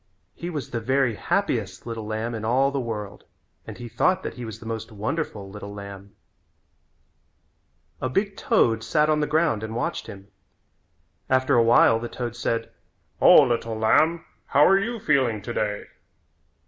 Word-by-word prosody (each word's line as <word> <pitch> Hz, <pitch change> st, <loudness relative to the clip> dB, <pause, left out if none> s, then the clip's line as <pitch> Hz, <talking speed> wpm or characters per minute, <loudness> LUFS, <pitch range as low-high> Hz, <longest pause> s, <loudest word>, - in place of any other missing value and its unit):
He 170 Hz, -, -6 dB
was 150 Hz, -7 st, -5 dB
the 115 Hz, -, -2 dB
very 130 Hz, +1 st, +1 dB
happiest -, -, -2 dB
little 115 Hz, -2 st, -5 dB
lamb 110 Hz, +2 st, -3 dB
in 110 Hz, -2 st, -5 dB
all 130 Hz, +5 st, +2 dB
the 140 Hz, -, -2 dB
world 105 Hz, -4 st, -5 dB, 0.4 s
and -, -, -8 dB
he 120 Hz, -, -7 dB
thought 145 Hz, +11 st, +1 dB
that -, -, -4 dB
he 125 Hz, -, -7 dB
was 110 Hz, -1 st, -7 dB
the 115 Hz, -, -12 dB
most 110 Hz, 0 st, -5 dB
wonderful 110 Hz, -1 st, -4 dB
little 100 Hz, +1 st, -9 dB
lamb. 100 Hz, -1 st, -10 dB, 1.9 s
A 130 Hz, -, -1 dB
big 195 Hz, +7 st, -1 dB
toad 115 Hz, -1 st, +2 dB
sat 150 Hz, +6 st, +2 dB
on 155 Hz, -, +2 dB
the 150 Hz, -, 0 dB
ground 155 Hz, -7 st, +1 dB
and 110 Hz, 0 st, -5 dB
watched 120 Hz, -, -3 dB
him. 100 Hz, -2 st, -11 dB, 1.0 s
After 130 Hz, 0 st, +2 dB
a 120 Hz, -, +5 dB
while 115 Hz, 0 st, +5 dB
the 120 Hz, +1 st, -5 dB
toad 120 Hz, -2 st, -5 dB
said: 115 Hz, -1 st, -2 dB, 0.5 s
"O, -, -, +8 dB
little 115 Hz, -2 st, -1 dB
lamb, 160 Hz, +10 st, +3 dB, 0.2 s
how 145 Hz, -, +5 dB
are 195 Hz, +3 st, +5 dB
you 230 Hz, +3 st, -3 dB
feeling 130 Hz, -, +1 dB
today?" 105 Hz, -1 st, -3 dB
115 Hz, 165 wpm, -24 LUFS, 110-140 Hz, 1.9 s, O